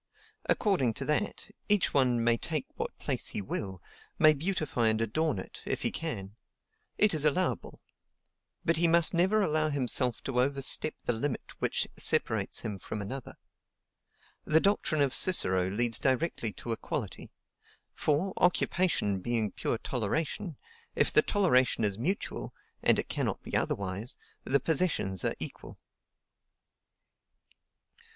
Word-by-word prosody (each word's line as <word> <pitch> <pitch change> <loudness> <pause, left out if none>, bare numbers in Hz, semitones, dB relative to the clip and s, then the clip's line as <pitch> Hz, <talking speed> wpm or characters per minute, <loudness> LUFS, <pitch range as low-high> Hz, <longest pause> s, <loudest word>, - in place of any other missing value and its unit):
According 155 - +2
to - - -4
that, 150 +7 -1 0.2
each 205 -2 +3
one 125 -4 +2
may 120 0 +4
take 155 +3 -2
what - - -5
place - - -1
he - - -2
will, 95 -2 -4 0.3
may 155 0 +6
beautify 150 -7 0
and 110 0 +2
adorn 130 +5 0
it, 95 - -8
if - - -3
he - - +2
can; 110 -13 -4 0.7
it 210 -2 +4
is 155 -2 +2
allowable: 155 +5 0 0.9
but 165 -1 +2
he 170 +1 +3
must 170 +1 +4
never 190 +5 +3
allow 155 -2 +1
himself 130 -3 +1
to 125 -2 0
overstep 140 +3 0
the 120 - +1
limit 125 +4 -3
which - - 0
separates - - +2
him 105 -3 -5
from 105 - -5
another. 125 +5 -6 1.1
The 155 +1 +4
doctrine 160 -6 +1
of 135 - 0
Cicero 95 - +3
leads 115 +3 +1
directly 130 -4 0
to 120 - -6
equality; 115 - -4 0.6
for, 155 +6 0
occupation 175 - +1
being 110 0 -1
pure 115 - -2
toleration, 150 - -2 0.4
if - - +3
the - - +7
toleration 130 - +2
is 100 0 0
mutual 140 - -3 0.3
(and - - +4
it - - -2
cannot - - -2
be - - -5
otherwise) 100 +6 -1 0.3
the 140 +1 +2
possessions 135 - +1
are - - 0
equal. - - -7
135 Hz, 135 wpm, -30 LUFS, 115-165 Hz, 1.1 s, the